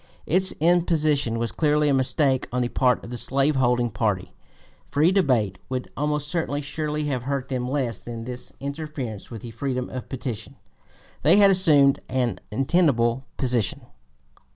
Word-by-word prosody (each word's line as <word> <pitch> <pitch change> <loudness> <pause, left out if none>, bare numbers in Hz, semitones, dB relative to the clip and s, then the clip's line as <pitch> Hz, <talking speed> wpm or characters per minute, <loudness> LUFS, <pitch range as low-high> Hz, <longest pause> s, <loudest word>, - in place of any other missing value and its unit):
Its 185 +3 +3
imposition 155 -7 +2
was 115 -1 -2
clearly 150 -1 +2
a 145 - +3
mistake 135 0 +1
on 125 0 0
the 120 - -2
part 125 -1 +2
of 115 - -9
the 120 - -2
slave 140 +2 +2
holding 120 -2 +2
party; 105 -4 -1 0.6
free 155 +5 +3
debate 120 - +1
would 130 -1 -4
almost 150 0 -1 0.3
surely 150 +1 -3
have 135 -4 -1
hurt 135 +1 -3
them 125 -2 -2
less 130 -5 -2
than 115 -1 -7
this 125 +1 -7
interference 140 -6 -6
with 115 -4 -8
the 120 - -7
freedom 125 +2 -3
of 130 - -6
petition. 120 -4 -5 0.7
They 165 +8 +5
had 200 -1 +7
assumed 150 -7 +4
an 125 -3 -1
untenable 130 -2 +2
position. 125 -1 0
135 Hz, 155 wpm, -24 LUFS, 120-150 Hz, 0.7 s, had